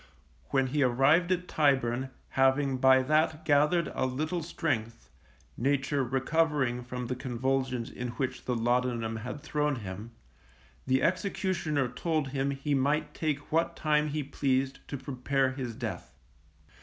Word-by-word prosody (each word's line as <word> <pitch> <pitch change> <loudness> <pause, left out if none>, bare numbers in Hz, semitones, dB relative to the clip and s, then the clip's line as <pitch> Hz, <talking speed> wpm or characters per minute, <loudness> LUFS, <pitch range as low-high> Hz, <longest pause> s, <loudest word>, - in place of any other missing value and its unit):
When 135 -1 +2
he 145 +3 0
arrived 135 +8 +4
at 180 0 0
Tyburn, 130 -4 +1 0.2
having 135 0 +2
by 130 0 +6
that 155 +2 +1
gathered 150 +3 +3
a - - 0
little 155 +7 -2
strength 115 -8 -3 0.4
(nature 140 +2 +1
recovering 135 -1 +1
from 125 0 -5
the 125 +2 -2
convulsions 130 -1 -1
in 125 - -5
which 130 +2 -4
the 125 - 0
laudanum 120 -1 0
had 125 +6 -6
thrown 150 -1 0
him), 100 +3 -7 0.8
the 130 0 +2
executioner 180 -6 0
told 150 +3 -1
him 135 +1 -1
he 140 +1 -2
might 145 +3 +1
take 150 -3 -3
what 165 +2 +1
time 150 -1 +2
he 150 0 -2
pleased 135 -1 0
to 140 - -4
prepare 135 0 0
his 130 -4 -5
death. 110 - -5
135 Hz, 140 wpm, -29 LUFS, 125-150 Hz, 0.8 s, by